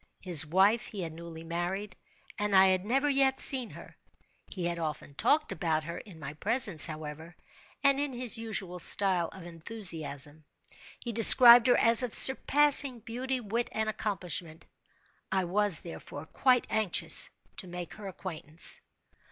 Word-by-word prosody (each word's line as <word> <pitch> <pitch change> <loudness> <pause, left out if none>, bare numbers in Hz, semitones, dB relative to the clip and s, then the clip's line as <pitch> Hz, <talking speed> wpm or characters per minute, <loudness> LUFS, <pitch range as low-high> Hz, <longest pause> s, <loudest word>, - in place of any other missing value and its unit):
His 165 -5 +4
wife 195 +7 0
he 200 -4 -9
had 165 -2 -9
newly 165 0 -13
married, 175 +4 -7 0.4
and 205 -1 -3
I 190 0 +4
had 185 -1 -2
never 270 +7 -2
yet 270 -1 -1
seen 255 -4 +5
her. - - -16 0.5
He 180 -3 -8
had 170 0 -5
often 155 -3 -8
talked 300 - -2
about 160 -3 -4
her 170 +2 -9
in 190 -6 -16
my 150 -1 -10
presence, 200 - +1
however, 155 +1 -11 0.5
and 275 -1 +1
in 290 -1 -2
his 245 -2 -2
usual 205 -6 -6
style 180 -1 -1
of 190 - -15
enthusiasm. 165 -5 -6 0.6
He 240 - -8
described 235 +2 +8
her 245 - +2
as 230 +1 +6
of 250 -3 -3
surpassing 275 -2 +6
beauty, 255 +4 -6
wit, 235 +1 -6
and 220 0 -4
accomplishment. 180 -6 -6 0.7
I 190 -1 -2
was, 195 -1 +1
therefore, 160 -3 -12
quite 250 +8 -1
anxious 215 -5 -1 0.3
to 185 - -5
make 175 -1 -10
her 210 -2 -12
acquaintance. 165 -4 -5
190 Hz, 150 wpm, -26 LUFS, 165-235 Hz, 0.7 s, described